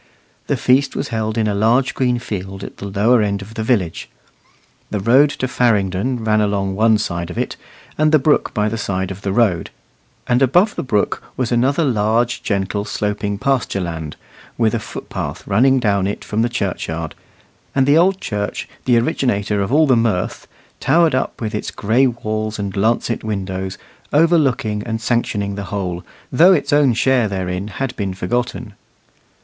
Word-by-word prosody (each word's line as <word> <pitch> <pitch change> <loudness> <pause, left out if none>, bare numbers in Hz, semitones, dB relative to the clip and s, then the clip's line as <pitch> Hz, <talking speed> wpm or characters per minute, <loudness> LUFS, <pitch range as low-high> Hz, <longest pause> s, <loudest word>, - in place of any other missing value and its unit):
The - - 0
feast 135 +2 +2
was - - -3
held 110 0 -2
in 110 - +2
a 105 - 0
large 115 +6 +2
green 125 -2 +1
field 95 -4 -6
at - - -9
the 100 - -6
lower 110 +5 +3
end 100 -1 -1
of 105 +3 -12
the 110 - -4
village. 105 -8 -1 0.8
The 105 - -2
road 130 +8 +5
to 130 - -3
Farringdon 115 0 0
ran 110 -1 +2
along 100 -2 0
one 110 +2 +4
side 85 -4 -3
of 90 - -7
it, - - -2 0.4
and 155 0 +4
the 155 - +6
brook 150 +1 +2
by 105 0 0
the 115 +1 -3
side 95 -2 -2
of 95 0 -8
the 100 - -2
road; 95 -6 +1 0.6
and 125 +1 +2
above 175 - +4
the - - -3
brook 105 -6 0 0.2
was 125 -2 -1
another 130 +6 +2
large, 115 0 +1
gentle, 100 0 -1
sloping 105 -1 -2
pasture 130 -4 0
land, 80 -3 -5 0.4
with 115 -1 +2
a 115 - 0
footpath - - -6
running 130 +7 +3
down 100 -5 +1
it 100 - -4
from 110 +1 -1
the 120 - +1
churchyard; 85 -7 -3 0.6
and 135 -1 +3
the 145 +4 +5
old 190 +2 +3
church, 105 - -3 0.2
the 125 -2 +4
originator 105 -4 0
of 100 - -2
all 155 +3 +5
the 130 -4 +4
mirth, 115 -6 -1 0.3
towered 165 -3 +3
up 130 - -1
with 110 -1 -3
its 105 - -3
gray 120 +6 +2
walls 110 -2 -3
and 100 -2 -4
lancet 115 +3 0
windows, 95 -3 -4 0.3
overlooking 140 -9 +2
and 110 +1 -3
sanctioning 110 -3 -1
the 100 0 -5
whole, 90 -3 -4 0.3
though 170 +8 +6
its 145 -4 0
own 145 -5 +4
share 125 -1 +2
therein 95 0 -3
had 125 +4 -4
been 95 -3 -3
forgotten. 120 +3 -3
110 Hz, 175 wpm, -19 LUFS, 100-125 Hz, 0.8 s, the